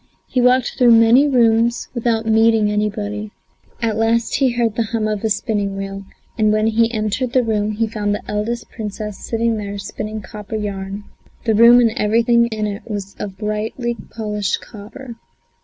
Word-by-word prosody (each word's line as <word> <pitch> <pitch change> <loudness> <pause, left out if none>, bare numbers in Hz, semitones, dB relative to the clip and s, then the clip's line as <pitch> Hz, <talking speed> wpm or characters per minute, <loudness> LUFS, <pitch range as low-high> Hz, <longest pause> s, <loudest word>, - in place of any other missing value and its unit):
He 255 - 0
walked 250 +1 +2
through 240 -2 +6
many 240 +6 +5
rooms 235 -3 +2
without 230 -2 0
meeting 220 -1 +3
anybody. 210 0 -2 0.5
At 220 -2 0
last 230 +1 +1
he 270 -1 +3
heard 235 -2 0
the 230 - 0
hum 220 0 -2
of 215 -1 -3
a 220 - +1
spinning 205 -3 -1
wheel, 195 0 -6 0.3
and 215 -1 +4
when 215 0 +2
he 225 +1 +2
entered 225 +3 -2
the 255 - +3
room 215 -2 -1
he 225 +2 0
found 210 -2 -2
the - - -9
eldest 220 +3 -3
Princess 210 -1 -6
sitting 230 0 -1
there 205 -1 -5
spinning 215 +2 -5
copper 210 +2 -8
yarn; 200 -1 -4 0.4
the 225 - +2
room 235 +3 +7
and 235 -2 +4
everything 235 +2 +2
in 215 -2 -3
it 205 0 -4
was 200 -2 -5
of 195 -2 -6
brightly 220 +3 -3
polished 210 -3 -2
copper. 230 +3 -11
220 Hz, 175 wpm, -19 LUFS, 210-235 Hz, 0.5 s, room